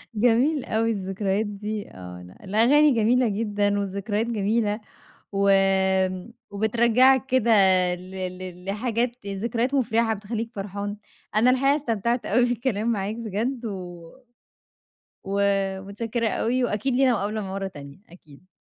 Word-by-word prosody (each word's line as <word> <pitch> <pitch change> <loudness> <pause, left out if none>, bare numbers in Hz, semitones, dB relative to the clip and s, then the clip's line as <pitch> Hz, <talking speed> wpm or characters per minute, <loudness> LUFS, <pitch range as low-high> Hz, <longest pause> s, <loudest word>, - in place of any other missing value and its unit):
جميل 245 +6 +2
أوي 225 +1 0
الذكريات 195 +1 -1
دي 205 +1 -5
آه 90 -1 -10
ن 90 - -13
الأغاني 250 +9 +4
جميلة 240 +2 +3
جدًا، 205 -1 0
والذكريات 200 +3 -2
جميلة 215 0 0 0.5
و 200 0 +1 1.0
وبترجعك 235 +5 +3
كده 255 -3 +2 0.4
ل 185 +1 -12 0.3
ل 180 -1 -9
لحاجات 235 +2 -2
ذكريات 230 +6 -2
مفرحة 230 -3 +2
بتخليك 225 +3 -5
فرحان، 200 +1 -5 0.4
أنا 235 +4 +5
الحقيقة 275 +3 +3
استمتعت 235 -2 -1
أوي 240 +4 +3
بالكلام 235 -2 -1
معاك 205 0 -2
بجد 230 +3 -3
و 175 -5 -7 1.1
و 200 +1 -1 0.4
متشكرة 225 +3 -2
أوي 245 +4 0
وأكيد 245 +4 -1
لينا 260 -1 +4
مقابلة 210 0 -2
مرة 195 0 -3
تانية 140 -4 -11
أكيد. 165 0 -18
215 Hz, 120 wpm, -24 LUFS, 200-235 Hz, 1.1 s, أنا